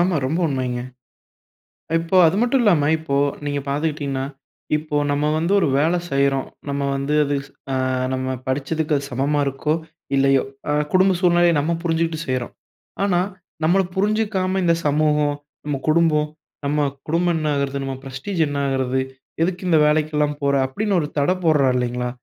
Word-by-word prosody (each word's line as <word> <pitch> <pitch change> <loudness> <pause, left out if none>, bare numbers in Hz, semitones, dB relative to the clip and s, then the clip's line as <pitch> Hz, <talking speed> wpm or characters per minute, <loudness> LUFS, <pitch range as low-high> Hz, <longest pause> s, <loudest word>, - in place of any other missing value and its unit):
ஆமா, 175 0 +2
ரொம்ப 155 +6 -1
உண்மைங்க. 125 -3 -2 1.2
இப்ப 170 +3 +2
அது 165 +4 +3
மட்டும் 245 +1 +2
இல்லாம, 160 -9 +4
இப்போ 160 -3 -3 0.3
நீங்க 145 0 -1
பார்த்துக்கிட்டீங்கன்னா, 145 -2 -1 0.5
இப்போ 150 -1 -3
நம்ம 145 +1 0
வந்து 170 +4 0
ஒரு - - +2
வேலை 165 +4 +2
செய்றோம். 140 -1 +2 0.2
நம்ம 140 0 -1
வந்து 140 +2 -1
அது 145 0 -1 0.4
அ - - +1 0.4
நம்ம 130 0 -2
படிச்சதுக்கு 150 +3 0
அது 140 - -4
சமமா 140 +4 0
இருக்கோ? 140 +3 -1 0.4
இல்லையோ? 135 -1 +4 0.3
அ - - +2 0.2
குடும்ப 185 0 +4
சூழ்நிலைய 175 -1 +4
நம்ம 165 +4 0
புரிஞ்சுட்டு 165 -1 0
செய்றோம். 130 -2 -2 0.5
ஆனா 185 -3 +2 0.4
நம்மள 175 +5 +4
புரிஞ்சுக்காம 200 -2 0
இந்த 170 -1 +3
சமூகம், 150 0 +2 0.3
நம்ம 145 -2 -1
குடும்பம், 155 -2 +3 0.4
நம்ம 145 0 +1 0.2
குடும்பம் 170 +2 +1
என்ன 155 -1 0
ஆகறது? 140 0 -1
நம்ம 135 -1 -3
ப்ரெஸ்டீஜ் 135 +7 -3
என்ன 145 - -3
ஆகறது? 130 -1 0 0.4
எதுக்கு 180 +1 -2
இந்த 165 - +5
வேலைக்கெல்லாம் 150 -1 +1
போற? 140 0 +2
அப்படின்னு 200 +7 0
ஒரு 150 - -2
தடை 180 +6 +2
போடுறாங்க 150 -4 +4
இல்லைங்களா, 125 0 -1
150 Hz, 150 wpm, -21 LUFS, 140-170 Hz, 1.2 s, இந்த